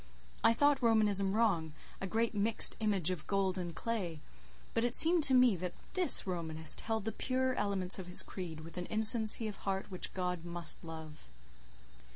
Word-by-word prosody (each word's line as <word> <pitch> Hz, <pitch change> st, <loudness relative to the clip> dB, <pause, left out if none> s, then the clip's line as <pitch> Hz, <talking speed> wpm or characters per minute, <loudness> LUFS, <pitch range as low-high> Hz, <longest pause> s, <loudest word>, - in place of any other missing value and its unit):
I 230 Hz, -, +4 dB
thought 285 Hz, +2 st, +1 dB
Romanism 210 Hz, -4 st, +3 dB
wrong, 195 Hz, -8 st, 0 dB, 0.3 s
a 195 Hz, -, -3 dB
great 225 Hz, +3 st, -1 dB
mixed 210 Hz, +2 st, +2 dB
image 200 Hz, -6 st, 0 dB
of 175 Hz, -4 st, -6 dB
gold 195 Hz, -2 st, -1 dB
and 175 Hz, -2 st, -6 dB
clay; 185 Hz, -9 st, -4 dB, 0.5 s
but 230 Hz, -, -1 dB
it 240 Hz, 0 st, -2 dB
seemed 330 Hz, +2 st, +6 dB
to 265 Hz, -, +3 dB
me 250 Hz, -4 st, +4 dB
that 180 Hz, 0 st, -6 dB, 0.2 s
this 370 Hz, -2 st, +5 dB
Romanist 160 Hz, -4 st, -1 dB
held 220 Hz, -2 st, -4 dB
the 220 Hz, -, -2 dB
purer 260 Hz, +1 st, -2 dB
elements 195 Hz, -5 st, -2 dB
of 185 Hz, -, -8 dB
his 180 Hz, -, +4 dB
creed 165 Hz, -4 st, -8 dB
with 165 Hz, +1 st, -13 dB
an 180 Hz, -, -6 dB
innocency 220 Hz, 0 st, +3 dB
of 210 Hz, -, -7 dB
heart 195 Hz, 0 st, -5 dB
which 185 Hz, -, -6 dB
God 180 Hz, -2 st, -4 dB
must 170 Hz, -2 st, -1 dB
love. 160 Hz, -, -11 dB
195 Hz, 180 wpm, -32 LUFS, 175-225 Hz, 0.5 s, seemed